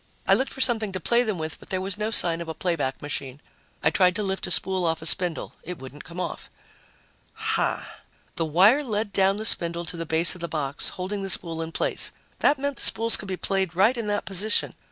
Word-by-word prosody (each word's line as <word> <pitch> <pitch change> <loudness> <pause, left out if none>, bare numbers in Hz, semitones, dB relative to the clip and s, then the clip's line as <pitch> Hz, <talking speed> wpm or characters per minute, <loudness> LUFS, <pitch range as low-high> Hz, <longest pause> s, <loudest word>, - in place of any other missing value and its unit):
I - - +5
looked 265 - +1
for 265 - -5
something 225 -5 +3
to 185 - -3
play 235 +7 +2
them 215 -6 -2
with, 160 -1 -6
but - - -16
there 185 - -1
was 190 0 -3
no 210 +1 -2
sign 170 -6 +3
of 165 - -7
a 160 - -5
playback 155 -8 -2
machine. 140 -2 -5 0.4
I - - +3
tried 180 -2 +3
to 210 - -2
lift 190 -1 -3
a - - -5
spool 185 +1 +2
off 165 -1 -1
a - - -7
spindle. 175 0 +2
It 180 +1 -7
wouldn't 135 +2 -11
come 175 +1 -9
off. - - -5 0.8
Hah! 445 0 -1 0.5
The 165 - -1
wire 195 - +4
led 215 -4 -3
down 195 +1 +2
the 215 - -5
spindle 170 -3 +4
to 170 - -5
the 165 -1 -5
base 160 +2 +3
of 180 - -10
the 170 - -3
box, 145 -3 -2
holding 195 +2 -5
the 195 - -4
spool 165 -3 +1
in 165 0 -5
place. - - 0 0.3
That 290 - +3
meant 280 -1 -3
the - - -2
spools 230 +1 +3
could 205 - -4
be 190 -1 -3
played 190 -3 -2
right 205 +8 +4
in 230 -3 -3
that 205 0 -1
position. 205 +3 +1
185 Hz, 235 wpm, -25 LUFS, 165-210 Hz, 0.8 s, I